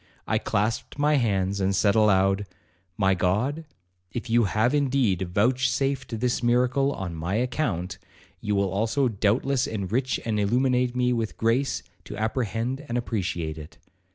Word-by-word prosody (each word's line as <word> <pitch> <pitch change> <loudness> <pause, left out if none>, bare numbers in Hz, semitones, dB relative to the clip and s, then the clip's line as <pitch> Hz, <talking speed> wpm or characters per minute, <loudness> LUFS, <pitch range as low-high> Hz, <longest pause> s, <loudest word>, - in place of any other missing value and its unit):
I - - +1
clasped 110 +6 -1
my 150 +1 +3
hands, 100 -5 0
and 95 +1 +1
said 100 +1 +3
aloud, 100 -2 +3 0.5
'My 95 -2 +3
God, 110 - 0 0.5
if 120 -1 -5
you 120 -1 +4
have 110 +6 +1
indeed 130 -10 +1
vouchsafed 130 +3 0
this 125 0 0
miracle 125 +3 +2
on 95 -9 -5
my 85 +4 -3
account, 110 - -2 0.4
you 105 +1 -1
will 100 -1 +1
also 115 +7 +1
doubtless 120 +5 +1
enrich 110 +5 -1
and 110 -2 0
illuminate 125 +3 +1
me 125 0 +2
with 115 -2 -3
grace 120 +5 0 0.2
to - - -7
apprehend 115 +4 -2
and 120 - -1
appreciate 85 -9 -3
it. 75 - -12
115 Hz, 145 wpm, -25 LUFS, 100-125 Hz, 0.5 s, you